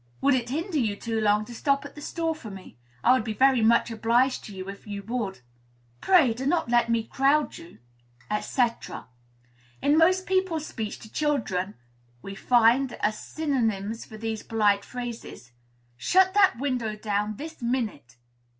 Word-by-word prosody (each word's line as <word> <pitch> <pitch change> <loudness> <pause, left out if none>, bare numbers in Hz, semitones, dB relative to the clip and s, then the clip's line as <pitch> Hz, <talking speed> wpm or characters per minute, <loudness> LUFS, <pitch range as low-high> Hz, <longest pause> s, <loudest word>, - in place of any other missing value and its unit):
"Would 280 +1 +3
it 240 -2 0
hinder 320 +4 -2
you 215 -5 0
too 225 +1 -3
long 210 0 +2
to 240 - -10
stop 275 +4 0
at 285 - -9
the 295 - -11
store 330 +1 -2
for 285 -9 -10
me? 195 -2 -11 0.3
I - - +5
would 255 - +2
be 220 -1 -4
very 260 0 +4
much 235 +1 +3
obliged 235 +4 +1
to - - -9
you, 185 0 -7
if 200 +2 -9
you 200 -1 -5
would." 215 - -4 0.6
"Pray, 320 -11 +4
do 260 +4 -4
not 335 -5 +1
let 240 -1 +3
me 230 -1 +1
crowd 275 +5 +1
you," 165 - -14 0.6
&c. 255 - +1 1.2
In 290 - +3
most 370 +3 +4
people's 375 -5 0
speech 220 -7 -5
to 220 - -12
children, 220 -11 -1 0.5
we 195 - -7
find, 240 +5 +3
as 215 0 -1
synonyms 225 -8 -2
for 220 - -11
these 220 0 -4
polite 205 -3 +1
phrases: 240 - -8 0.5
"Shut 375 - +3
that 390 -10 +4
window 245 -5 -2
down, 210 0 -2
this 315 +4 -9
minute." 225 - -3
235 Hz, 170 wpm, -26 LUFS, 215-280 Hz, 1.2 s, I